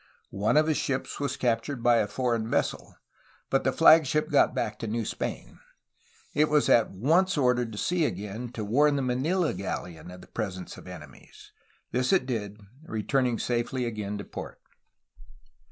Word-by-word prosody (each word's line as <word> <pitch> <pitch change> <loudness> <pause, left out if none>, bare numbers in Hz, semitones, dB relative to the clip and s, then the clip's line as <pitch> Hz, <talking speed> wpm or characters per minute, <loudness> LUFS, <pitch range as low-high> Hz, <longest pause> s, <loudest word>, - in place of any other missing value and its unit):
One 100 +8 +1
of 155 - +5
his 155 -1 +1
ships 130 -1 -2
was 140 -2 -2
captured 120 +1 -1
by 120 -1 +5
a 105 - +1
foreign 115 0 -1
vessel, - - -1 0.6
but - - +2
the - - +2
flagship 155 -1 +5
got - - +4
back - - -2
to 115 - -4
New 115 +1 -2
Spain. - - -5 0.7
It 150 +1 +3
was 150 -1 +3
at 115 - +5
once 165 - +2
ordered 125 -4 +2
to 105 - -8
sea 175 +6 +1
again 105 +2 -4
to 110 -3 -4
warn 145 +7 +3
the 140 - 0
Manila 150 +8 0
galleon 90 -2 -5
of 90 0 -11
the - - -15
presence 95 -5 -5
of - - -13
enemies. - - -13 0.4
This 125 +1 +1
it 190 -9 +3
did, 105 -5 -4 0.2
returning 125 -2 0
safely 125 +1 -1
again 105 -3 -4
to 100 - -6
port. - - -8
120 Hz, 170 wpm, -27 LUFS, 105-145 Hz, 0.7 s, of